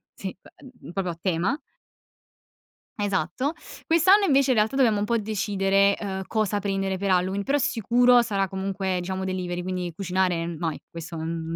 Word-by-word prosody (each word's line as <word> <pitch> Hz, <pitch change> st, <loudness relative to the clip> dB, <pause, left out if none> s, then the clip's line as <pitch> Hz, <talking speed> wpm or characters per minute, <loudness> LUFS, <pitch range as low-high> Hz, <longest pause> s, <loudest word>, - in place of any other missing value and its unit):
sì, 190 Hz, -2 st, -6 dB
beh, 250 Hz, -9 st, -14 dB
proprio 185 Hz, -2 st, -2 dB
a -, -, -25 dB
tema. 185 Hz, -, 0 dB, 1.4 s
Esatto. 205 Hz, -, -1 dB, 0.3 s
Quest'anno 375 Hz, +5 st, +5 dB
invece 275 Hz, -3 st, +3 dB
in 250 Hz, -, +3 dB
realtà 220 Hz, +5 st, +2 dB
dobbiamo 235 Hz, -6 st, +3 dB
un 205 Hz, -, 0 dB
po' 235 Hz, -, +1 dB
decidere, 200 Hz, -2 st, +1 dB
uhm, 190 Hz, -2 st, -4 dB
cosa 215 Hz, -2 st, 0 dB
prendere 195 Hz, -1 st, -1 dB
per 195 Hz, +1 st, -1 dB
Halloween, 185 Hz, +2 st, +1 dB
però 275 Hz, +6 st, +1 dB
sicuro 245 Hz, 0 st, +4 dB
sarà 200 Hz, -4 st, -1 dB
comunque 190 Hz, 0 st, -2 dB
diciamo 190 Hz, +1 st, -3 dB
delivery, 180 Hz, -1 st, -3 dB
quindi 180 Hz, -1 st, -3 dB
cucinare 180 Hz, -2 st, 0 dB
no, 165 Hz, -1 st, -3 dB, 0.2 s
questo, 165 Hz, 0 st, -8 dB
n 165 Hz, 0 st, -4 dB
195 Hz, 155 wpm, -25 LUFS, 180-220 Hz, 1.4 s, Quest'anno